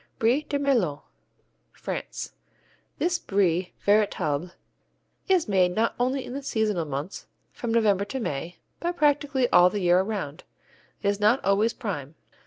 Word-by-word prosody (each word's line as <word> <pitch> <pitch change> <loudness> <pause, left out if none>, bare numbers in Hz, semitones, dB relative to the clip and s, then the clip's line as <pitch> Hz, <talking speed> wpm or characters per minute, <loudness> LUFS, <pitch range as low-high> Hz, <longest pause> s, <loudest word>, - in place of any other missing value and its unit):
Brie 240 +6 +3
de 290 -1 -2
Melun 235 - +1 0.7
France - - -5 0.7
This 345 -1 0
Brie 185 -2 +1
véritable 180 -6 +1 0.8
is 365 -7 +3
made 185 -3 +2
not 225 +1 +1
only 260 +2 0
in - - -7
the 280 - -4
seasonal 215 - 0
months, 145 +6 -5 0.2
from 235 - -4
November 210 -4 +3
to 265 +6 -4
May, 165 - -4 0.2
but 345 +1 -2
practically 290 -3 +2
all 180 0 +7
the 205 - -3
year 175 0 +4
around. 190 -7 -3 0.6
It - - 0
is 200 0 +1
not 215 +5 +4
always 205 +4 +3
prime. 155 - -5
210 Hz, 145 wpm, -26 LUFS, 180-255 Hz, 0.8 s, all